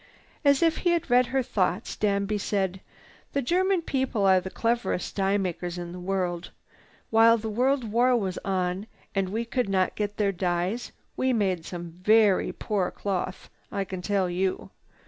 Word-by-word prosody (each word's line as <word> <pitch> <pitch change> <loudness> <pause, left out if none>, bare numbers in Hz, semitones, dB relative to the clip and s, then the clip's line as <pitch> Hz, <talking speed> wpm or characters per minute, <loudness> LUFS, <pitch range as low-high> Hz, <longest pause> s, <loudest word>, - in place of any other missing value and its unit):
As 280 +1 +4
if 325 -1 +3
he 350 -1 +2
had 330 -6 -1
read 250 0 +5
her 265 +1 0
thoughts, 200 -5 -1
Danby 205 0 0
said: 190 -2 -1 0.5
"The 280 - +1
German 365 +5 +2
people 260 -8 0
are 190 -1 +6
the 190 - -6
cleverest 230 -3 -1
dye 195 0 +2
makers 180 -2 -3
in 175 -1 -5
the 180 - -7
world. 180 -2 -2 0.6
While 225 +1 +6
the 220 0 -4
World 255 +4 +2
War 245 +2 +4
was 190 -5 -2
on 185 +1 -2 0.3
and 195 -2 0
we 225 +4 -2
could 245 -2 -1
not 185 -1 +1
get 205 -1 -3
their 205 -2 +2
dyes, 180 +4 -1 0.2
we 260 0 +1
made 190 -7 0
some 175 -1 -7
very 210 -1 +4
poor 200 -4 -1
cloth 190 -1 -4 0.2
I 200 - -1
can 185 -1 -6
tell 195 -1 +1
you. 185 +2 -2
200 Hz, 170 wpm, -26 LUFS, 185-235 Hz, 0.6 s, are